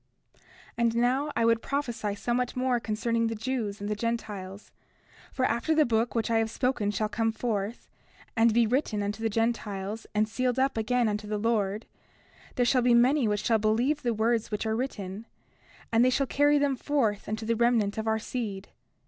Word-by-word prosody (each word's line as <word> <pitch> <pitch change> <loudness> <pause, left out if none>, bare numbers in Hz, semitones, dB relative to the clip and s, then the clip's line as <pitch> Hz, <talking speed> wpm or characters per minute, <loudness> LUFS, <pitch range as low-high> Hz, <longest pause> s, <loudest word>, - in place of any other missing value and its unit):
30:3 - - -31 0.4
And 235 -1 +2
now, 255 +5 +1
I 230 - +2
would 230 0 +3
prophesy 240 -7 -2
somewhat 240 +4 -1
more 255 -1 +1
concerning 230 +1 -1
the 225 - -3
Jews 220 -3 -3
and 205 - -4
the 210 - 0
Gentiles. 210 -3 -4 0.6
For 260 - 0
after 245 +8 +1
the 310 -1 +5
book 230 0 +1
of - - -16
which 230 0 0
I 225 - +3
have 225 0 0
spoken 245 -3 0
shall 210 +1 -1
come 225 +2 0
forth, 220 -1 -3 0.5
and 225 0 +4
be 235 +1 +4
written 220 -3 0
unto 205 +2 -3
the 225 - +1
Gentiles, 215 -2 -2
and 215 +1 +2
sealed 250 +3 -1
up 265 +1 +1
again 235 +2 +1
unto 210 0 -2
the 210 0 -2
Lord, 210 -1 0 0.7
there 245 - +2
shall 255 +1 +3
be 245 0 +4
many 250 +2 +4
which 210 0 -1
shall 225 -1 +2
believe 235 +8 +1
the 240 - 0
words 225 +1 0
which 210 +1 -3
are 220 0 0
written; 220 -4 -5 0.6
and 230 +1 +4
they 255 - +5
shall 275 +2 +1
carry 290 +2 +3
them 285 -1 +1
forth 240 -8 -1
unto 220 +1 -3
the 230 +1 +1
remnant 225 -3 +2
of 220 - -3
our 220 0 +2
seed. 210 -4 -5
230 Hz, 200 wpm, -28 LUFS, 215-245 Hz, 0.7 s, the